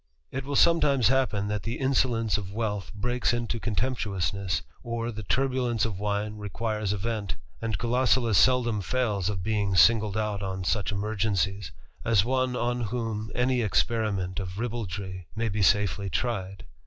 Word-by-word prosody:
205 135 - -3
It - - -12
will 140 - -2
sometimes 140 -7 +4
happen 125 -6 +1
that 105 0 -2
the 115 +4 -3
insolence 125 -5 +1
of 100 -3 -3
wealth 105 -2 -3
reaks 125 +2 +1
into 120 -1 -2
contemptuousness, 100 - -1 0.2
or 115 0 -3
the 110 -1 -6
turbulence 125 +1 +1
of 100 -5 -4
wine 105 +1 -2
iquires 105 0 -2
a 105 - 0
vent; 105 0 -3 0.3
and 110 -4 -1
Gulosulus 120 -1 +2
seldom 120 -4 +3
fails 105 -3 0
of 95 -4 -3
being 100 -2 0
singled 105 +3 +5
at 105 -2 -1
on 95 -1 -3
such 105 +3 0
emergencies, 100 -2 -1 0.3
as 110 -4 +3
one 130 0 +1
on 120 0 -1
whom 110 -1 -3
any 125 0 +2
experiment 100 0 0
r 95 - -3
ribaldry 100 -6 -4
may 115 0 0
be 105 +1 -2
safely 100 0 +2
tried. 95 -1 -2
110 Hz, 155 wpm, -27 LUFS, 100-120 Hz, 0.3 s, singled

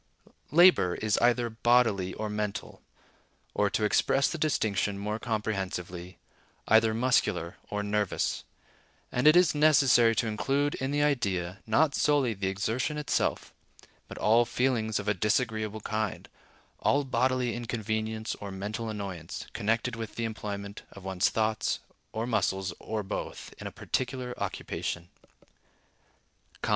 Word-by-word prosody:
Labor 170 - +6
is 110 -1 0
either 120 0 +3
bodily 115 -5 +2
or 110 - -3
mental; 105 -1 -4 0.7
or, 105 -1 +2
to 105 - -1
express 135 +6 +3
the 170 - -4
distinction 105 -9 0
more 105 +2 -3
comprehensively, 95 -5 -3 0.5
either 110 0 +5
muscular 100 -7 +1
or 105 0 -2
nervous; 105 -1 -1 0.7
and 125 +4 +2
it 155 - +8
is 175 -4 +5
necessary 135 -6 +5
to - - +1
include 135 +7 0
in 130 - -3
the 145 +1 +1
idea, 100 -10 0
not 140 +7 +3
solely 140 -6 +2
the 100 -1 -3
exertion 110 +10 -1
itself, 150 - -1 0.5
but - - -9
all 115 +3 +4
feelings 120 -3 0
of 100 - -4
a 105 - +3
disagreeable 110 +1 0
kind, 110 -1 -3 0.5
all 145 +1 +2
bodily 130 -1 +1
inconvenience 110 -1 -3
or 100 - -5
mental 105 +4 -4
annoyance, 100 -6 -5
connected 115 +3 0
with 115 -2 -6
the 115 - -2
employment 100 -2 -5
of 100 - -12
one's 95 -1 +1
thoughts, 110 0 0 0.3
or 110 +1 -2
muscles, 95 -5 0
or 110 -1 -3
both, 95 - -5
in - - -5
a - - -6
particular 125 -1 -3
occupation. 85 0 -4
110 Hz, 130 wpm, -29 LUFS, 100-125 Hz, 0.7 s, it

